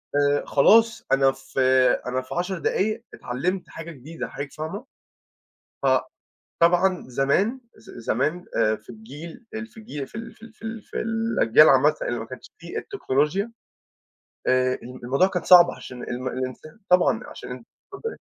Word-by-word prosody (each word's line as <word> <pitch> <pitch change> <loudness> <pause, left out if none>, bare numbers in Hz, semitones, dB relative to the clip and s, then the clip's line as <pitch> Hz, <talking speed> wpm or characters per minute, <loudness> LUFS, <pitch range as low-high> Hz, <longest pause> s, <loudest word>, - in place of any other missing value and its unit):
آآ، 145 0 +2
خلاص. 225 +10 +4
أنا 135 0 +5
في 135 0 -7 0.5
أنا 130 +1 -1
في 130 - -8
10 180 +2 -1
دقايق 215 +6 0
اتعلَّمت 180 +10 -3
حاجة 165 +1 -8
جديدة، 155 +3 -7
حضرتِك 140 0 -7
فاهمة؟ 160 - -6 1.0
ف - - +1 0.8
طبعًا 180 +2 +4
زمان 140 - +1 0.2
ز - - -17 0.2
زمان، 155 +9 0
آآ 110 0 +3
في 110 - -19
الجيل 145 - -10
ال 220 +1 -5
في 225 - -22
الجيل، 150 - -6
في - - -17
ال 230 +1 -6
في - - -26
ال 225 0 -13
في 220 - -22
ال 225 0 -5
في - - -8
الأجيال 225 +1 +4
عامةً - - +5
اللي - - -2
ما - - -5
كانتِش - - -11
فيه - - -7
التكنولوجيا، 190 - -1 1.0
آآ 130 0 +3
الم 125 +1 -10
الموضوع 135 +9 +3
كان 180 -3 -2
صعب، 175 -1 +8
عشان 125 -1 -9
الم 125 +1 -4
الإنسان 130 - -6
طبعًا 180 -10 +4
عشان - - -10 0.4
اتفضَّلي. 455 +4 -5
165 Hz, 160 wpm, -24 LUFS, 130-215 Hz, 1.0 s, صعب